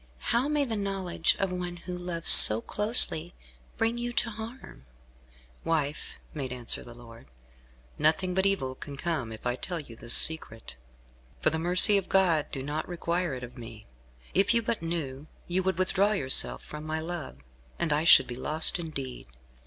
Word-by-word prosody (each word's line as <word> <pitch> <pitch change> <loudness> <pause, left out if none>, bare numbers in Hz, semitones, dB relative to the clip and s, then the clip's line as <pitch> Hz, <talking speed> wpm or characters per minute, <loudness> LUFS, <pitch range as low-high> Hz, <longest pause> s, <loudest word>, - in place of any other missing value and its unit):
How 240 +4 0
may 295 -1 -1
the 230 -4 -5
knowledge 195 -4 -2
of 195 -2 -3
one 180 -1 -6
who 180 +1 -9
loves 175 -2 +3
so 110 +1 +12
closely, 180 - +1 0.4
bring 230 +1 -2
you 240 0 -5
to 230 - -2
harm?" 220 - -12 0.8
"Wife," 150 -3 -4 0.2
made 135 -4 -6
answer 125 -2 -4
the 120 - -14
lord, 115 - -16 0.7
"nothing 180 +4 0
but 190 +1 0
evil 135 -10 -2
can 140 +1 -11
come 150 -8 -4
if 110 - -12
I 125 0 -2
tell 175 +6 -6
you 130 -7 -12
this 120 - +1
secret. 115 - -1 0.6
For - - +1
the 160 - -3
mercy 180 +4 +4
of 190 - -11
God 175 -6 +1
do 135 - -7
not 150 +4 -6
require 175 -3 -3
it 125 - -10
of 125 +1 -11
me. 110 -2 -12 0.5
If 200 +5 +1
you 230 - 0
but 225 -2 -4
knew, 155 -4 -6 0.2
you 180 +2 -2
would 190 -2 -3
withdraw 195 +3 0
yourself 135 -9 +2
from 150 0 -10
my 155 0 -5
love, 160 - -8 0.4
and 160 -3 -2
I 150 +2 -1
should 165 -2 +6
be 120 - -9
lost 155 +7 +1
indeed." 140 - -8
165 Hz, 175 wpm, -26 LUFS, 135-190 Hz, 0.8 s, so